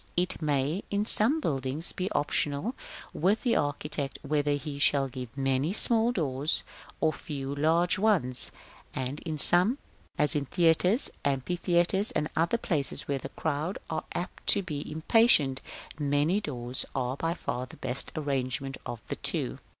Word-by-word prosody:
It 180 -1 0
may, 150 +4 0
in 205 +1 0
some 235 +9 +4
buildings, 135 - 0
be 185 +1 -3
optional 145 - -1 0.4
with 195 +7 +1
the 240 -3 +2
architect 145 -1 -2
whether 145 0 0
he 145 0 -5
shall 140 -1 +3
give 125 0 -8
many 135 +5 0
small 230 +2 +5
doors, 150 - 0 0.4
or 160 -1 +2
few 140 -3 -5
large 165 +5 +2
ones; 180 - +3 0.4
and 130 +3 -2
in 155 -2 -5
some, 180 - +5 0.4
as 150 - +3
theatres, 170 - +3
amphitheatres, 175 +7 +1
and 150 - -1
other 170 +7 +1
places 155 - -1
where 140 -1 -1
the 135 - -7
crowd 155 +6 -3
are 155 -1 -3
apt 180 - -6
to 200 - +3
be 150 -5 -5
impatient, 155 - +3 0.4
many 145 +7 +1
doors 125 -7 0
are 130 -1 -1
by 165 +4 -2
far 125 -7 -4
the - - -14
best 130 +1 0
arrangement 135 -2 -2
of 120 -2 -6
the - - -4
two. - - -2
150 Hz, 150 wpm, -28 LUFS, 135-180 Hz, 0.4 s, small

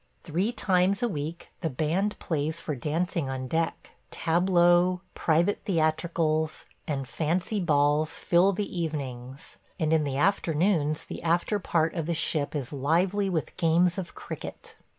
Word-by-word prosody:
Three 180 +8 0
times 195 -2 +1
a - - +3
week 160 -3 -5
the 165 - 0
band 165 +9 0
plays 160 0 -2
for 155 - -4
dancing 155 +3 -1
on 130 -1 -4
deck; 165 +5 -2 0.2
tableaux, 175 +1 +3
private 170 +5 +1
theatricals, 160 -2 0 0.2
and 135 -3 -2
fancy 175 - -1
balls 150 -2 +2
fill 180 +3 +4
the 200 +2 -2
evenings, 135 -3 -5 0.2
and 160 0 +1
in 160 -1 +3
the 140 -2 -2
afternoons 160 -2 +1
the - - -8
after 170 +5 +1
part 165 -3 +1
of 165 -3 -3
the 170 - 0
ship 155 -2 -1
is 140 -1 -4
lively 180 +8 +1
with 165 -4 -2
games 175 +2 +3
of 180 - -7
cricket. - - -8
165 Hz, 145 wpm, -27 LUFS, 150-180 Hz, 0.2 s, fill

